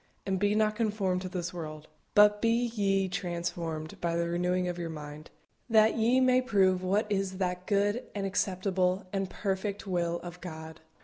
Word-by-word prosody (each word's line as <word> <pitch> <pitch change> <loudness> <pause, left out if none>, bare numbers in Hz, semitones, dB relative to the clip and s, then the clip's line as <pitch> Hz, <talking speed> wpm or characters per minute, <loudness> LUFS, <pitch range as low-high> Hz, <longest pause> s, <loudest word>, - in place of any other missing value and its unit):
And 190 -2 0
be 205 +1 +2
not 215 0 +2
conformed 205 -5 0
to 185 - -5
this 180 -1 -4
world: 155 -3 -7 0.3
but 210 0 +6
be 235 +1 +2
ye 195 -3 +1
transformed 170 -4 -4
by 170 -1 0
the 170 0 0
renewing 180 +1 0
of 175 0 -3
your 170 -1 -3
mind, 150 0 -8 0.4
that 220 -1 +5
ye 235 +3 +3
may 255 0 +4
prove 190 -6 +3
what 195 +4 +1
is 195 -1 -1
that 180 -1 -2
good, 205 +3 +1
and 200 -1 -2
acceptable, 185 -1 0
and 195 -1 -1
perfect 200 0 -3
will 170 -2 -1
of 175 0 -9
God. 160 -2 -8
185 Hz, 175 wpm, -30 LUFS, 175-205 Hz, 0.4 s, but